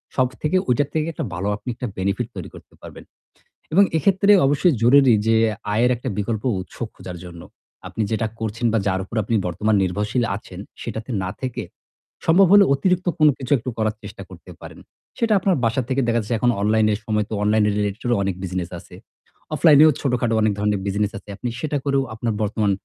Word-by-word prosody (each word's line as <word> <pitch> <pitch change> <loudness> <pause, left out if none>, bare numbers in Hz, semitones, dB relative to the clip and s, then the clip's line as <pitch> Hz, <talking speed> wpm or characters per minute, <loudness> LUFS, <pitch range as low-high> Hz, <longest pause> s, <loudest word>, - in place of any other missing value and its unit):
সবথেকে 130 +7 0
ওইটার 135 +3 +2
থেকে 155 0 0
একটা - - -4
ভালো 90 +4 -3
আপনি 105 +5 -8
একটা 125 +1 -4
benefit 100 +5 -1
তৈরি 90 - -7
করতে - - -15
পারবেন। - - -11 0.7
এবং 200 - +6
এক্ষেত্রে 195 +5 +3
অবশ্যই 145 +4 +3
জরুরি 130 0 +6
যে 115 - +4 0.4
আয়ের 120 +3 +3
একটা 125 +2 -5
বিকল্প 105 +1 -2 0.2
উৎস 95 - -10 0.2
খুঁজার 90 -1 -8
জন্য। 85 -1 -10 0.5
আপনি 110 - -5
যেটা 110 0 0
করছেন 110 +2 -3
বা - - +3
যার 95 -1 0
উপর 105 - -10
আপনি 115 +2 -1
বর্তমান 105 +5 0
নির্ভরশীল 105 +6 -1
আছেন 95 -3 -10 0.2
সেটাতে 115 +2 -6
না 95 - -3
থেকে 130 -3 -4 0.6
সম্ভব 180 +4 +5
হলে 205 -1 +8
অতিরিক্ত 180 +5 0
কোন 155 - +6
কিছু 130 0 -7
একটু 120 - -5
করার 110 0 0
চেষ্টা - - -9
করতে - - -13
পারেন। - - -11 0.4
সেটা 230 -2 +1
আপনার 190 0 +1
বাসা 115 +3 +1
থেকে 135 +1 +1
দেখা 120 0 +2
যাচ্ছে 115 +2 -2
এখন 120 +1 +3
অনলাইনে 110 +1 +2
এর - - -7
সময় 105 -1 0
তো - - -5
online 105 0 +3
related 105 0 -2 0.2
অনেক 95 -2 -2
বিজনেস 90 -1 -3
আছে। - - -15 0.6
অফলাইনেও 155 0 +6
ছোটখাটো 125 -4 0
অনেক 110 -1 +2
ধরনের 105 -1 0
বিজনেস 105 +1 -1
আছে। 105 - -14
আপনি 120 +5 -4
সেটা 150 0 -2
করেও 140 -1 +1
আপনার 115 -1 -2
বর্তমান 105 -1 0
115 Hz, 190 wpm, -21 LUFS, 105-135 Hz, 0.7 s, হলে